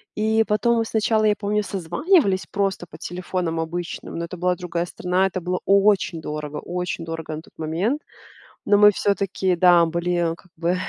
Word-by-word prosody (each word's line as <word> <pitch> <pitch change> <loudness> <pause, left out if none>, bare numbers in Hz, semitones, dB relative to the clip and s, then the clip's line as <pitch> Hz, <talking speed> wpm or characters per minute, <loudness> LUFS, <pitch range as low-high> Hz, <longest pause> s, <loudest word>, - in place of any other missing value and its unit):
И 220 +1 +2
потом 235 +3 +2
мы 225 - +1
сначала, 220 0 +1
я 210 -1 +4
помню, 210 +1 0
созванивались 195 - +1
просто 195 -3 -1
по - - -11
телефонам 175 -1 -3
обычным, 170 +2 -5
но 170 - -2
это 170 - -8
была 180 +1 +1
другая 175 0 -3
страна- 180 +2 0
это 185 0 -4
было 180 +1 -2
очень 195 -3 +3
дорого, 150 -1 -5
очень 180 -1 -4
дорого 160 -1 -5
на 155 - -7
тот - - -21
момент. 175 - -1 0.6
Но 205 - +4
мы 210 0 +8
всё-таки, 195 -2 0
да, 175 -1 +6
были, 170 0 0
как 180 - -22
бы, 175 +2 0
180 Hz, 175 wpm, -23 LUFS, 170-205 Hz, 0.6 s, мы